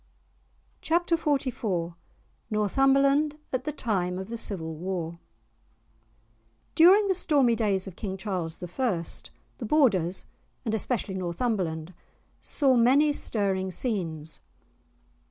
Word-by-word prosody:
*Chapter 340 +1 +2
XLIV* 240 - -1 0.6
*Northumberland 275 +7 +3 0.2
at 255 0 -1
the 300 - -1
time 185 -10 -1
of 190 +2 -6
the 235 - -4
Civil 175 -8 -4
War* 170 0 -4 1.5
During 385 +5 +7
the 385 - +3
stormy 285 -9 +3
days 205 -4 0
of 190 -3 -9
King 190 -1 -4
Charles 180 -5 -4
I., 180 0 -1 0.6
the 240 - -4
Borders, 200 - +2 0.4
and 220 - -1
especially 220 -2 -1
Northumberland, 180 -3 -2 0.5
saw 270 -4 +2
many 270 +5 +5
stirring 195 -7 -1
scenes. 170 - -3
210 Hz, 105 wpm, -27 LUFS, 180-270 Hz, 1.5 s, During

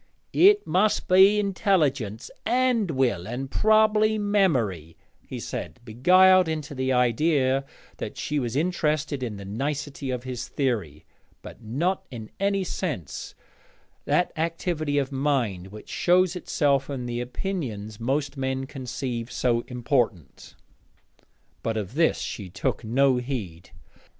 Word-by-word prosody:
'It 410 +2 +5
must 210 +3 +1
be 190 +3 +6
intelligence, 155 - 0
and 245 -4 +2
will, 120 - 0
and 130 +4 -5
probably 215 0 +4
memory,' 130 - 0 0.3
he - - -6
said, - - -6
beguiled 185 +10 +5
into 155 -2 -4
the 130 -1 -1
idea 130 +2 +2 0.3
that - - -6
she 150 0 -1
was 120 -2 -3
interested 155 -3 0
in 115 -5 -4
the 100 - -8
nicety 140 +6 -3
of 125 -1 -3
his 125 -2 -5
theory, 100 - -2 0.4
'but - - -11
not 160 - -1
in 115 -5 -9
any 195 0 +1
sense 150 - -5 0.7
that 180 - +2
activity 160 -2 -1
of 140 -1 0
mind 130 -10 -1
which 105 +2 -12
shows 180 0 +2
itself 140 -6 0
in 130 -3 -4
the 120 0 -3
opinions 120 - -4
most 140 +4 -1
men 130 0 -2
conceive 125 -3 -5
so 120 -2 +1
important.' 120 - -2 1.1
But 115 -1 -2
of 105 0 -4
this 160 +3 +2
she 100 -4 -5
took - - -2
no 130 +3 +3
heed. 110 -10 -5
135 Hz, 130 wpm, -25 LUFS, 120-175 Hz, 1.1 s, be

